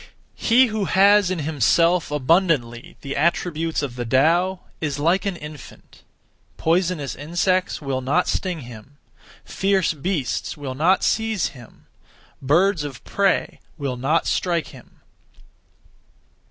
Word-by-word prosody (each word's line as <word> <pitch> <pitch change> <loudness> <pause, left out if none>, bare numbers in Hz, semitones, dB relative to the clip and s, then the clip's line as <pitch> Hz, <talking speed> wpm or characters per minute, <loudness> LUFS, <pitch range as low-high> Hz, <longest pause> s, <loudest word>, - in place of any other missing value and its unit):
1. - - -9
He 245 +3 +6
who 215 -4 -2
has 200 +1 +4
in 185 - -2
himself 160 +3 +2
abundantly 150 -5 0
the 140 0 -5
attributes 165 0 0
(of 130 -4 -4
the 125 - -3
Tao) 165 +10 +2 0.2
is 145 -3 -2
like 170 +7 +1
an 195 - -2
infant. 150 -4 -12 0.6
Poisonous 165 -4 0
insects 175 +4 -1
will 135 -2 -2
not 140 +8 +1
sting 180 -5 -2
him; 120 +3 -12 0.5
fierce 195 -3 0
beasts 155 -3 -3
will 140 -3 -5
not 165 +8 +2
seize 220 -5 0
him; 120 -4 -16 0.6
birds 165 +5 +2
of 140 -4 -8
prey 195 -1 0 0.2
will 140 -4 -3
not 135 +7 0
strike 170 -5 -1
him. 130 -4 -17
160 Hz, 125 wpm, -22 LUFS, 140-185 Hz, 0.6 s, He